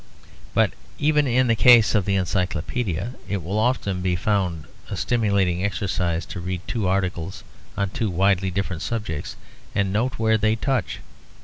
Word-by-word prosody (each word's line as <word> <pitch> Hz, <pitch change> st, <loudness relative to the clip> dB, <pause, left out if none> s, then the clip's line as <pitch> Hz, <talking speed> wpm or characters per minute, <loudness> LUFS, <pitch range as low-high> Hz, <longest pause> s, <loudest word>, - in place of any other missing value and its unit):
But -, -, +4 dB, 0.3 s
even 150 Hz, -1 st, +2 dB
in 130 Hz, +1 st, +3 dB
the 115 Hz, -, +3 dB
case 120 Hz, -1 st, +6 dB
of 105 Hz, -4 st, +2 dB
the 100 Hz, -, +1 dB
Encyclopedia, 95 Hz, +3 st, -1 dB, 0.2 s
it 100 Hz, -3 st, -2 dB
will 95 Hz, +6 st, -1 dB
often 110 Hz, -6 st, 0 dB
be 90 Hz, -1 st, +1 dB
found 90 Hz, -4 st, -1 dB, 0.2 s
a -, -, -4 dB
stimulating 100 Hz, -6 st, +1 dB
exercise 95 Hz, -4 st, -1 dB
to 95 Hz, -, -7 dB
read 90 Hz, 0 st, -4 dB
two 110 Hz, -5 st, -1 dB
articles 95 Hz, -1 st, -2 dB, 0.3 s
on 100 Hz, -2 st, 0 dB
two 110 Hz, 0 st, -1 dB
widely 95 Hz, +1 st, +2 dB
different 95 Hz, -3 st, -3 dB
subjects 90 Hz, -6 st, -4 dB, 0.4 s
and 100 Hz, -2 st, +1 dB
note 120 Hz, +5 st, 0 dB
where 110 Hz, 0 st, +2 dB
they 110 Hz, +1 st, +2 dB
touch. 125 Hz, -2 st, -1 dB
100 Hz, 155 wpm, -23 LUFS, 90-110 Hz, 0.4 s, case